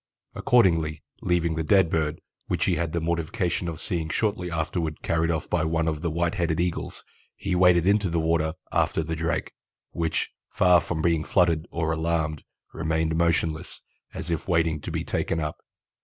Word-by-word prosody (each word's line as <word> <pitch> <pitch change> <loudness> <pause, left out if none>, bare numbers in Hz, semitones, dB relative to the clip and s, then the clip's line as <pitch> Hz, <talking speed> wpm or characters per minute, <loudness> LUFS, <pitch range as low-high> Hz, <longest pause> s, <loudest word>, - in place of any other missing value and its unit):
Accordingly, 85 - +2 0.2
leaving 85 -2 +1
the 80 0 -1
dead 95 0 +4
bird, 80 -1 -1 0.3
which - - 0
he - - +2
had 85 -1 -1
the 85 - -1
mortification 85 +3 -1
of 80 -2 -5
seeing 80 -3 -2
shortly 100 -2 -1
afterward 80 -1 -2
carried 80 0 +1
off 80 -2 -1
by 85 -3 0
one 80 +1 0
of 80 -2 -1
the 85 - -1
white 85 +2 0
headed 85 -5 0
Eagles, 85 -1 -2 0.3
he 95 - -3
waded 90 -1 +5
into 100 -1 +3
the 85 0 0
water 80 0 +1 0.2
after 80 - +1
the 80 +1 -3
drake, 80 +1 -2 0.4
which, 80 -1 -1 0.2
far 90 -1 +4
from 80 -2 -3
being 85 -2 +2
fluttered 85 -1 +2
or 80 -1 -1
alarmed, 80 -2 -1 0.3
remained 80 0 0
motionless, 80 -1 0 0.3
as 85 - -5
if 85 - -2
waiting 80 -4 +1
to - - -6
be - - -2
taken 80 - -1
up. 75 -1 -3
80 Hz, 175 wpm, -26 LUFS, 80-85 Hz, 0.4 s, waded